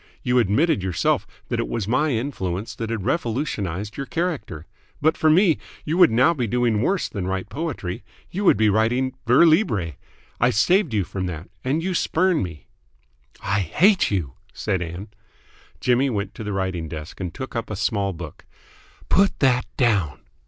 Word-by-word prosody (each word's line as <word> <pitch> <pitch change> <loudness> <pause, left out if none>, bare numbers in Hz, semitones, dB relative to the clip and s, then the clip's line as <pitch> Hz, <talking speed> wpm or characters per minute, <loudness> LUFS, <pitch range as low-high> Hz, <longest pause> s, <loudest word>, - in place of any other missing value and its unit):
You 125 0 +3
admitted 120 - +2
yourself 95 -2 0 0.2
that - - -1
it - - -1
was 100 - -3
my 150 +7 +2
influence 110 -6 -3
that 115 -1 -5
had 115 -4 -3
revolutionised 110 - -2
your 140 - -4
character. 165 - -3 0.3
But 155 +2 +3
for 155 - +2
me, 170 +1 +4 0.3
you 155 - -1
would 180 -2 +7
now 130 +9 +4
be 125 -7 -2
doing 120 -2 +1
worse 190 +8 +1
than 95 -4 -4
write 95 +1 -3
poetry. 115 - -4 0.3
You 200 +4 -3
would - - +6
be 110 - +3
writing 115 +5 +2
vers 125 +8 +6
libre. 110 - +2 0.5
I - - +4
saved 170 - +2
you 100 - +2
from 95 +1 -4
that. 85 0 -6
And 145 +6 0
you 185 +1 -1
spurn 180 0 +2
me!" 85 -5 -6 0.8
"I 95 +1 +1
hate 180 - +3
you!" 85 -10 -2 0.2
said 95 -4 -1
Ann. 85 +4 -6 0.7
Jimmy 125 +2 +2
went 100 -4 -3
to - - -7
the 105 - -4
writing 95 -4 -2
desk 75 +1 -8
and 90 -3 -3
took 130 +7 -7
up 115 - -3
a 105 - -3
small 100 -1 0
book. 85 -3 -9 0.6
"Put 195 +1 +3
that 125 -3 +2
down!" 100 - +1
110 Hz, 175 wpm, -23 LUFS, 95-145 Hz, 0.8 s, would